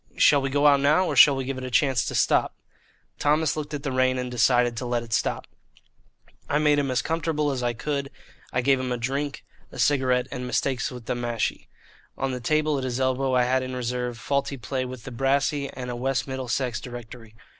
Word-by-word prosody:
Shall 145 Hz, -1 st, +5 dB
we 135 Hz, -, -1 dB
go 145 Hz, +2 st, +1 dB
out 140 Hz, -1 st, +6 dB
now, 150 Hz, +7 st, +3 dB
or -, -, -2 dB
shall 145 Hz, -, +8 dB
we 135 Hz, -1 st, -3 dB
give 135 Hz, 0 st, -4 dB
it -, -, -7 dB
a 130 Hz, -, -4 dB
chance 125 Hz, -2 st, +2 dB
to -, -, -4 dB
stop?" -, -, +2 dB, 0.6 s
Thomas 155 Hz, +2 st, +2 dB
looked 150 Hz, -1 st, -4 dB
at 145 Hz, -, -6 dB
the 140 Hz, -, -2 dB
rain 130 Hz, 0 st, +2 dB
and 125 Hz, -1 st, -3 dB
decided 120 Hz, 0 st, +3 dB
to 125 Hz, -, -3 dB
let 120 Hz, -1 st, -1 dB
it 115 Hz, -1 st, -7 dB
stop. -, -, 0 dB, 1.0 s
I 145 Hz, -, +2 dB
made 150 Hz, -1 st, +3 dB
him 140 Hz, -1 st, -1 dB
as 130 Hz, -, 0 dB
comfortable 160 Hz, -2 st, -1 dB
as 130 Hz, -2 st, -3 dB
I 120 Hz, -1 st, 0 dB
could. 140 Hz, +4 st, -3 dB, 0.4 s
I 125 Hz, -, 0 dB
gave 135 Hz, +1 st, +3 dB
him 130 Hz, -1 st, -3 dB
a 125 Hz, -, 0 dB
drink, 135 Hz, +4 st, -3 dB, 0.3 s
a -, -, -11 dB
cigarette, 130 Hz, -3 st, +2 dB
and 125 Hz, 0 st, -5 dB
Mistakes 130 Hz, 0 st, 0 dB
with 125 Hz, -3 st, -10 dB
the -, -, -1 dB
Mashie. 120 Hz, -2 st, -2 dB, 0.5 s
On 135 Hz, 0 st, -1 dB
the 125 Hz, -, -4 dB
table 155 Hz, +3 st, +1 dB
at -, -, -5 dB
his 125 Hz, -1 st, -2 dB
elbow 130 Hz, 0 st, +1 dB
I 125 Hz, -, +4 dB
had 130 Hz, +1 st, +1 dB
in 130 Hz, 0 st, -5 dB
reserve 125 Hz, -1 st, -3 dB
Faulty 140 Hz, +2 st, -1 dB
Play 130 Hz, +2 st, -3 dB
with 125 Hz, -2 st, -8 dB
the 135 Hz, -, -8 dB
Brassy 140 Hz, +3 st, 0 dB
and 125 Hz, -1 st, -6 dB
a -, -, -4 dB
West 130 Hz, +2 st, -1 dB
Middlesex 130 Hz, -2 st, -2 dB
Directory. 120 Hz, -2 st, -10 dB
130 Hz, 220 wpm, -25 LUFS, 125-140 Hz, 1.0 s, shall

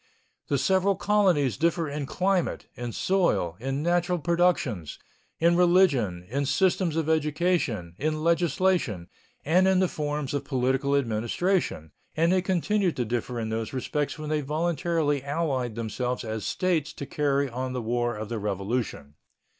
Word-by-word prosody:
The 140 Hz, -, +1 dB
several 190 Hz, +7 st, +2 dB
colonies 185 Hz, -, +2 dB
differed 165 Hz, -2 st, 0 dB
in 145 Hz, -2 st, -3 dB
climate, 185 Hz, +1 st, 0 dB
in 120 Hz, -1 st, -5 dB
soil, 175 Hz, -, +1 dB
in 135 Hz, +4 st, -2 dB
natural 175 Hz, +1 st, +1 dB
productions, 170 Hz, -, 0 dB, 0.4 s
in 170 Hz, +1 st, +3 dB
religion, 165 Hz, -, +3 dB
in 140 Hz, +6 st, -1 dB
systems 185 Hz, -1 st, +2 dB
of 160 Hz, -2 st, 0 dB
education, 155 Hz, -, 0 dB
in 155 Hz, +1 st, -1 dB
legislation, 170 Hz, -, +1 dB, 0.4 s
and 180 Hz, +5 st, +4 dB
in 190 Hz, -1 st, +4 dB
the 185 Hz, -, +3 dB
forms 150 Hz, -3 st, -3 dB
of 145 Hz, -, -1 dB
political 135 Hz, +1 st, 0 dB
administration, 120 Hz, -, 0 dB, 0.3 s
and 165 Hz, +2 st, +3 dB
they 185 Hz, 0 st, +3 dB
continued 190 Hz, 0 st, +1 dB
to 125 Hz, -, -1 dB
differ 120 Hz, +1 st, -3 dB
in 110 Hz, -1 st, -3 dB
these 110 Hz, +2 st, -3 dB
respects 145 Hz, +4 st, -2 dB
when 155 Hz, 0 st, -5 dB
they 155 Hz, -1 st, +1 dB
voluntarily 155 Hz, -1 st, 0 dB
allied 140 Hz, -6 st, -1 dB
themselves 125 Hz, +3 st, -3 dB
as 110 Hz, -1 st, -4 dB
States 165 Hz, -6 st, 0 dB
to 140 Hz, -, -6 dB
carry 140 Hz, 0 st, 0 dB
on 130 Hz, +1 st, -4 dB
the 125 Hz, -, -2 dB
War 120 Hz, +1 st, 0 dB
of 110 Hz, 0 st, -5 dB
the 115 Hz, 0 st, -3 dB
Revolution. 100 Hz, -, -3 dB
145 Hz, 150 wpm, -26 LUFS, 120-175 Hz, 0.4 s, and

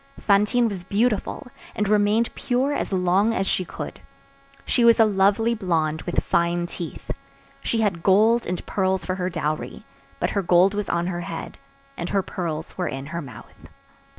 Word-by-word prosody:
Fantine 210 Hz, +4 st, +3 dB
was 195 Hz, -5 st, -5 dB
beautiful, 215 Hz, +7 st, 0 dB, 0.3 s
and 210 Hz, -, 0 dB
remained 210 Hz, +2 st, +2 dB
pure 260 Hz, +3 st, 0 dB
as -, -, -2 dB
long 190 Hz, +4 st, +2 dB
as 195 Hz, -, 0 dB
she 185 Hz, -, 0 dB
could. -, -, -7 dB, 0.7 s
She 245 Hz, -, +2 dB
was 235 Hz, 0 st, +6 dB
a 225 Hz, -, +7 dB
lovely 205 Hz, +3 st, +3 dB
blonde, 160 Hz, -7 st, 0 dB
with 175 Hz, -, 0 dB
fine 170 Hz, 0 st, +1 dB
teeth. 170 Hz, -1 st, -6 dB, 0.5 s
She 225 Hz, -, 0 dB
had 195 Hz, -6 st, 0 dB
gold 215 Hz, +6 st, +4 dB
and 180 Hz, 0 st, -3 dB
pearls 190 Hz, -1 st, 0 dB
for 185 Hz, -, -1 dB
her 185 Hz, 0 st, -2 dB
dowry; 155 Hz, -3 st, -3 dB, 0.3 s
but -, -, 0 dB
her 200 Hz, -, 0 dB
gold 180 Hz, +2 st, +4 dB
was 205 Hz, -1 st, -3 dB
on 170 Hz, 0 st, 0 dB
her 175 Hz, -1 st, -3 dB
head, 165 Hz, -1 st, -7 dB, 0.4 s
and 175 Hz, -, -4 dB
her 195 Hz, -1 st, +1 dB
pearls 160 Hz, -4 st, -5 dB
were 180 Hz, -, 0 dB
in 135 Hz, +1 st, -5 dB
her 170 Hz, -, -2 dB
mouth. 125 Hz, -8 st, -12 dB
190 Hz, 175 wpm, -24 LUFS, 175-215 Hz, 0.7 s, a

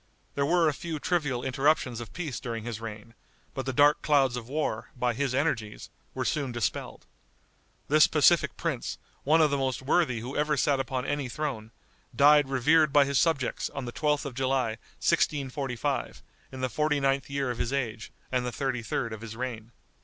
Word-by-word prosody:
There 140 Hz, 0 st, 0 dB
were 170 Hz, 0 st, +3 dB
a 150 Hz, -, +2 dB
few 165 Hz, +1 st, -5 dB
trivial 145 Hz, -7 st, -1 dB
interruptions 135 Hz, -2 st, +1 dB
of 115 Hz, -3 st, -9 dB
peace 160 Hz, -7 st, -4 dB
during 115 Hz, -2 st, -5 dB
his 115 Hz, -1 st, -5 dB
reign; 110 Hz, 0 st, -8 dB, 0.4 s
but 135 Hz, -1 st, -5 dB
the -, -, +1 dB
dark 145 Hz, +3 st, +4 dB
clouds 135 Hz, -4 st, +3 dB
of 120 Hz, -1 st, -6 dB
war, 145 Hz, -6 st, -2 dB
by 125 Hz, -1 st, +1 dB
his 130 Hz, +1 st, -1 dB
energies, 115 Hz, -8 st, -2 dB, 0.2 s
were -, -, -2 dB
soon 140 Hz, -4 st, -1 dB
dispelled. 120 Hz, -4 st, -3 dB, 0.8 s
This -, -, +6 dB
pacific -, -, +3 dB
prince, -, -, -3 dB, 0.3 s
one 160 Hz, +3 st, +4 dB
of 150 Hz, -2 st, +4 dB
the 140 Hz, -, +1 dB
most 130 Hz, -1 st, -2 dB
worthy 140 Hz, -4 st, +2 dB
who 125 Hz, +4 st, -6 dB
ever 150 Hz, 0 st, +1 dB
sat 140 Hz, 0 st, +2 dB
upon 130 Hz, 0 st, -2 dB
any 145 Hz, -2 st, -2 dB
throne, 125 Hz, -6 st, -4 dB, 0.5 s
died 145 Hz, 0 st, +6 dB
revered 150 Hz, +4 st, +4 dB
by 145 Hz, 0 st, +5 dB
his 140 Hz, -1 st, +1 dB
subjects 160 Hz, -7 st, 0 dB
on 140 Hz, -2 st, -6 dB
the 120 Hz, -, -5 dB
12th 150 Hz, -1 st, 0 dB
of 140 Hz, -, -5 dB
July, 130 Hz, -1 st, 0 dB, 0.3 s
1645, 135 Hz, -4 st, -1 dB, 0.3 s
in 130 Hz, -, -7 dB
the 130 Hz, -, +1 dB
forty 150 Hz, +2 st, 0 dB
ninth 135 Hz, 0 st, 0 dB
year 140 Hz, -2 st, -1 dB
of 120 Hz, -, -6 dB
his 120 Hz, -, -1 dB
age 115 Hz, -6 st, -3 dB, 0.2 s
and 125 Hz, -1 st, +1 dB
the 125 Hz, -, -3 dB
thirty 130 Hz, -2 st, -2 dB
third 115 Hz, +1 st, -3 dB
of 110 Hz, -, -8 dB
his 115 Hz, -1 st, -7 dB
reign. 120 Hz, -2 st, -5 dB
135 Hz, 190 wpm, -28 LUFS, 120-145 Hz, 0.8 s, This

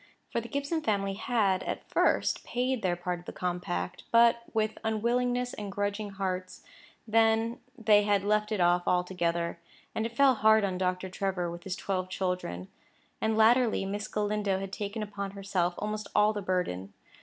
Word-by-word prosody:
For 235 Hz, -, 0 dB
the 235 Hz, -, -9 dB
Gibson 280 Hz, +5 st, -1 dB
family 200 Hz, -5 st, 0 dB
had, 205 Hz, -4 st, +1 dB
at -, -, -5 dB
first, -, -, +2 dB
paid 250 Hz, 0 st, -1 dB
their 180 Hz, -3 st, +1 dB
part 175 Hz, 0 st, -3 dB
of 175 Hz, -, -16 dB
the -, -, -6 dB
compact, 180 Hz, 0 st, -3 dB
but 235 Hz, 0 st, +5 dB
with 220 Hz, -1 st, -1 dB
unwillingness 245 Hz, +3 st, 0 dB
and 205 Hz, -2 st, -6 dB
grudging 205 Hz, +1 st, -2 dB
hearts; 185 Hz, -2 st, -4 dB, 0.4 s
then 225 Hz, +2 st, +3 dB, 0.2 s
they 215 Hz, -2 st, +5 dB
had 205 Hz, -1 st, +2 dB
left 210 Hz, +1 st, +1 dB
it 215 Hz, -, 0 dB
off 175 Hz, 0 st, +3 dB
altogether, 170 Hz, -2 st, 0 dB, 0.3 s
and 220 Hz, -, -1 dB
it 235 Hz, 0 st, -14 dB
fell 275 Hz, -2 st, +6 dB
hard 220 Hz, -1 st, +4 dB
on 185 Hz, -2 st, -1 dB
Dr. 185 Hz, 0 st, -1 dB
Trevor 185 Hz, -2 st, -2 dB
with 170 Hz, +2 st, -9 dB
his 190 Hz, -1 st, -2 dB
twelve 185 Hz, -2 st, -2 dB
children; 180 Hz, -, -3 dB, 0.5 s
and, 220 Hz, 0 st, +1 dB
latterly, 225 Hz, -1 st, +4 dB
Miss 205 Hz, +2 st, -3 dB
Galindo 210 Hz, -2 st, 0 dB
had 195 Hz, 0 st, -6 dB
taken 210 Hz, +2 st, -3 dB
upon 200 Hz, -1 st, -5 dB
herself 180 Hz, -3 st, 0 dB
almost 210 Hz, 0 st, -3 dB
all 210 Hz, +1 st, +5 dB
the 205 Hz, -, -3 dB
burden. 170 Hz, -, -2 dB
205 Hz, 170 wpm, -29 LUFS, 185-220 Hz, 0.5 s, fell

